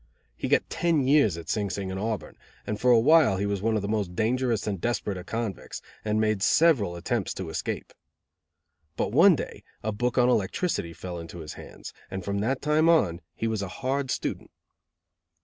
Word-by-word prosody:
He - - -4
got - - +2
ten 165 -6 +1
years 135 - +4
at 85 - -9
Sing 105 -3 -1
Sing 95 0 -4
and 95 - -4
Auburn, 110 0 -3 0.3
and 105 0 -4
for 125 - +3
a 120 -2 +7
while 145 -5 +5
he 100 - -1
was 100 -2 -1
one 110 +1 +1
of 105 - -1
the - - -2
most 100 -4 -2
dangerous 115 +1 0
and 100 -4 -3
desperate 120 -4 -1
of 90 0 -8
convicts, 115 -4 -4 0.2
and 105 0 0
made 110 -2 +1
several 125 - +3
attempts 100 +4 -2
to 95 -3 -5
escape. - - -4 1.0
But - - -1
one 170 - +7
day - - -6 0.2
a 110 - -1
book 120 +5 -1
on 125 -1 +5
electricity 105 - 0
fell 85 +1 -6
into 85 +1 -9
his 75 - -7
hands, - - -10 0.2
and 95 -1 -5
from 100 0 -1
that 130 +6 -1
time 155 +2 +3
on 90 - +3
he - - -3
was 110 -2 -1
a 100 - -3
hard 135 +6 -2
student. - - -3
110 Hz, 200 wpm, -27 LUFS, 95-125 Hz, 1.0 s, a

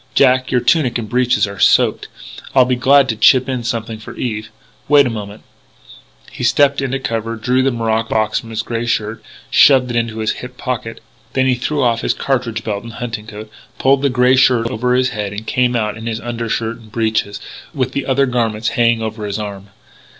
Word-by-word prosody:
Jack, 130 -1 +3
your 125 -2 +1
tunic 125 -1 +2
and 115 -2 -5
breeches 125 -3 +2
are 100 -2 -8
soaked; - - +3 0.5
I'll 130 -2 +6
be 125 0 +1
glad 135 +2 +4
to 110 - 0
chip 130 +4 +4
in 130 -3 -3
something 115 -1 -4
for 110 - -10
Eve.... 110 -3 -4 0.4
Wait 145 -1 +6
a 125 - -1
moment 105 -2 -7 0.5
" - - -21
He - - -7
stepped 140 +3 +3
into 135 0 -1
cover, 115 -3 -3
drew 125 +3 +1
the 135 - +2
morocco 115 -2 -1
box 110 -1 0
from 115 - -12
his 110 -1 -3
grey 115 +1 -3
shirt, 110 -1 -2 0.3
shoved 130 -3 +5
it - - -4
into 115 -1 -1
his 110 0 0
hip 125 0 -9
pocket. 125 -3 -4 0.3
Then 130 0 +2
he 130 - +3
threw 130 +4 -1
off 115 -1 +1
his - - 0
cartridge 120 -4 -2
belt 100 -2 -3
and 115 -1 -9
hunting 115 -3 -6
coat, 110 0 -9 0.3
pulled 135 0 +3
the 140 - +2
grey 125 0 +3
shirt 125 -3 +3
over 125 +1 0
his 130 0 +2
head 105 -2 -4
and 105 +2 -7
came 125 0 +1
out 105 -2 -1
in 110 +1 -8
his 115 -1 -3
undershirt 115 -1 -3
and 110 -2 -17
breeches, 110 -2 -1 0.3
with 130 -3 -2
the 140 0 -3
other 135 +1 +2
garments 115 -3 -1
hanging 115 -1 +1
over 110 -1 -4
his 100 - -3
arm. 100 -2 -7
115 Hz, 210 wpm, -17 LUFS, 110-125 Hz, 0.5 s, I'll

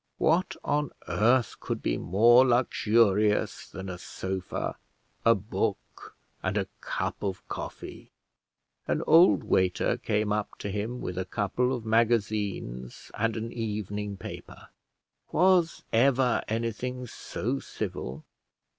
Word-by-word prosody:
What 170 +4 +2
on 150 -2 0 0.2
earth 120 +2 +2
could - - -4
be - - +1
more 115 - +5
luxurious 110 -4 +2
than 95 0 -7
a 90 -2 -6
sofa, 95 0 -4 0.5
a 115 0 +6
book, 100 +1 -4 0.3
and - - -1
a - - +1
cup - - -3
of 95 -2 -4
coffee? - - -7 0.8
An - - 0
old 165 +4 +6
waiter 95 -1 +1
came 105 -1 0
up 105 -1 -3
to 100 - -4
him, 110 +5 -3
with 90 0 -4
a 95 - -2
couple 115 +4 0
of 120 -4 -3
magazines 105 - 0
and 115 +1 0
an 115 +1 -4
evening 105 -2 -3
paper. - - -10 0.6
Was 180 -1 +3
ever 125 +1 +3
anything 115 +3 -3
so 125 +2 -4
civil? 65 - -5
110 Hz, 120 wpm, -28 LUFS, 100-125 Hz, 0.8 s, a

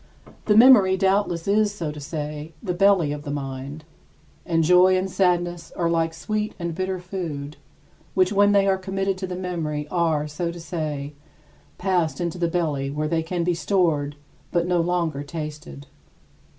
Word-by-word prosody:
The 210 -1 +4
memory 220 -6 +7
doubtless 190 -3 +1
is, 210 +1 +3
so 170 -7 -4
to 150 - -9
say, 150 +1 -6
the 180 - -1
belly 185 -4 +3
of 145 0 -4
the 145 - -7
mind: 140 +1 -5 0.6
and 165 -1 +2
joy 180 +3 +5
and 185 +1 -1
sadness 175 -2 0
are 170 -1 0
like 165 -1 0
sweet 215 +5 -3
and 170 -2 -3
bitter 185 +2 -2
food, 165 -6 -6 0.6
which 185 +1 +3
when 205 0 +5
they 200 -1 +4
are 190 -1 +2
committed 195 0 -1
to 190 - -3
the 180 - -5
memory 165 -5 -3
are, 160 -4 +1
so 170 +3 -3
to 170 - -9
say, 150 -3 -4 0.6
passed 180 -4 0
into 175 0 -3
the 170 - +1
belly 155 -5 -1
where 150 +2 -2
they 165 +1 0
can 170 +1 -2
be 175 +1 +1
stored 165 -5 0 0.4
but 170 -1 +1
no 175 -1 +2
longer 170 -4 -1
tasted. 150 - -7
170 Hz, 170 wpm, -23 LUFS, 150-185 Hz, 0.6 s, memory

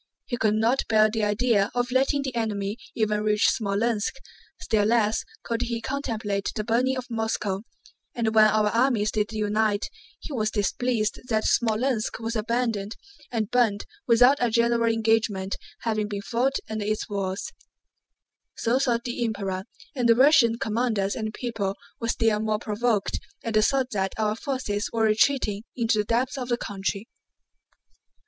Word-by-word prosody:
He 245 - -3
could 215 -3 +1
not 230 +5 +2
bear 215 -1 +4
the 220 -1 -1
idea 210 -1 +2
of 245 0 0
letting 270 +2 +2
the 265 -2 -4
enemy 210 -3 -2 0.2
even 210 -2 +1
reach 210 0 +3
Smolénsk, 215 +1 0 0.5
still 210 -2 +1
less 220 -1 +2 0.2
could 230 0 -2
he 235 -1 -2
contemplate 230 -6 -2
the 215 - -2
burning 250 +4 +1
of 255 - -4
Moscow, 220 -3 -1 0.5
and 225 -2 0
when 215 -1 +7
our 215 0 +2
armies 230 -2 +2
did 210 0 -1
unite 215 0 0 0.3
he 300 - -8
was 215 -4 0
displeased 215 +1 -1
that 220 -1 +1
Smolénsk 225 0 +1
was 230 +1 -3
abandoned 225 -2 -1 0.4
and 220 -4 -2
burned 230 -5 +2 0.2
without 245 +4 +6
a 245 - +2
general 235 0 +2
engagement 220 -4 +1 0.3
having 215 -2 -1
been 200 -1 -5
fought 250 +5 0
under 220 -1 -3
its 215 +1 -2
walls. 195 -2 -3 1.1
So 240 +3 +1
thought 240 -3 +1
the 240 0 -3
Emperor, 195 -4 -3 0.3
and 245 -3 +1
the 230 - +7
Russian 255 -3 +5
commanders 220 -4 0
and 220 -1 -3
people 215 -5 -3 0.2
were 230 - -3
still 225 -2 +2
more 215 0 0
provoked 215 -1 -1 0.2
at 230 - -3
the 215 - +4
thought 260 +2 +1
that 195 -2 -1
our 215 -1 0
forces 230 -5 -3
were 225 -1 0
retreating 215 -1 +2
into 230 -3 +1
the 210 - +1
depths 245 +5 0
of 250 -1 -5
the 240 - +1
country. 200 0 -4
225 Hz, 160 wpm, -25 LUFS, 210-240 Hz, 1.1 s, when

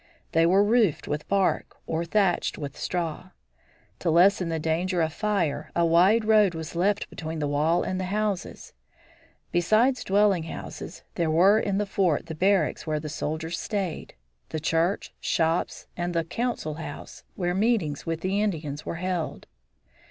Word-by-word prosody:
They 165 +1 +4
were 190 +3 +5
roofed 215 -6 +2
with 150 0 -3
bark 195 -2 0
or 165 +1 -2
thatched 190 0 +1
with 145 -3 -6
straw. 175 0 -3 0.7
To 175 - -1
lessen 180 +2 +4
the 165 - -1
danger 170 +4 0
of 160 -1 +1
fire 200 -7 -1
a 170 - +3
wide 185 +7 +4
road 210 -5 +4
was 160 +1 -6
left 195 +4 +1
between 160 0 -5
the 150 -1 -1
wall 150 +4 +2
and 185 - -2
the 185 - -2
houses. 205 -1 -3 0.8
Besides 220 +9 +3
dwelling 200 -2 +3
houses, 165 +1 -8
there 170 -2 0
were 190 +7 +5
in 200 -3 -1
the 210 - 0
fort 190 -6 +1
the 160 - -6
barracks 185 -1 +1
where 155 -1 0
the 155 0 -6
soldiers 155 +2 -3
stayed, 195 - -4 0.3
the 155 - -3
church, 165 +5 0
shops, 165 +1 0
and 175 0 -3
the 165 - +2
council 205 -3 -3
house, - - -8
where 175 -1 -1
meetings 195 - +1
with 165 0 -3
the 195 +2 0
Indians 155 -8 -2
were - - -4
held. 180 -1 -3
175 Hz, 160 wpm, -26 LUFS, 160-200 Hz, 0.8 s, were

